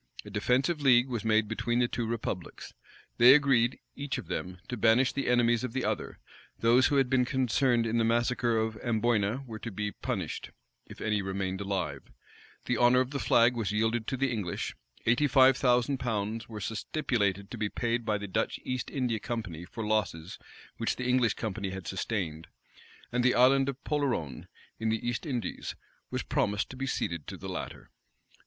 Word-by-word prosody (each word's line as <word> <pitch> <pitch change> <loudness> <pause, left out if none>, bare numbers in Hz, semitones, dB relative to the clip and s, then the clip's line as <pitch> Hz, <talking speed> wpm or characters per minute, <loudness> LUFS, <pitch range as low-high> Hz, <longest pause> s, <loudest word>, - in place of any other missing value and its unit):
A 105 - -9
defensive 130 +9 +1
league 130 -2 +5
was 120 -5 -3
made 110 -1 +3
between 120 +2 -1
the 120 0 +3
two 120 -1 -3
republics. 110 -6 -5 0.5
They 125 +3 +9
agreed, 130 -5 +3 0.2
each 140 0 -3
of - - -6
them, 90 0 -4
to 125 - -3
banish 115 +3 +3
the 140 - -2
enemies 120 -1 +3
of 125 -3 -4
the 130 -2 -1
other: - - -3 0.4
those 120 +3 +4
who 145 - 0
had 135 -2 +4
been 130 0 +3
concerned 125 -1 +1
in 115 +1 0
the - - +3
massacre 120 0 +1
of 110 0 -1
Amboyna 115 +1 0
were 110 -3 -7
to 115 - -5
be 105 0 -3
punished, - - -4 0.4
if - - -12
any 105 -2 0
remained 95 0 -3
alive; 90 -9 -2 0.6
the 125 - 0
honor 120 +2 +5
of 130 +1 0
the 140 - -2
flag 120 -1 +4
was 110 -4 -1
yielded 110 +1 0
to 130 - -2
the 135 0 +1
English: 105 -7 -3 0.3
eighty 120 +6 +3
five 135 -1 +6
thousand 125 +1 +2
pounds 110 -1 -2
were 110 -2 -6
stipulated 105 -3 -1
to - - -5
be 105 - 0
paid 120 +1 -1
by 105 -1 0
the 105 0 -6
Dutch 95 - -1
East 130 -2 -3
India 125 -5 -1
Company 90 -8 -5
for 110 +4 -6
losses 95 -6 -1 0.4
which 115 - -1
the 125 - -3
English 125 -3 +3
Company 100 -3 -3
had 95 -1 -7
sustained; 90 -5 -3 0.6
and 125 0 +1
the 130 - +4
Island 135 +2 +5
of 135 -1 -7
Polerone, 125 - -2 0.3
in 110 0 0
the 110 +1 -1
East 120 +6 -2
Indies 125 -5 -4 0.3
was - - -3
promised 105 0 0
to - - -8
be 135 +1 -3
ceded 85 - -2
to - - -6
the - - -8
latter. - - -6
115 Hz, 190 wpm, -29 LUFS, 105-125 Hz, 0.6 s, They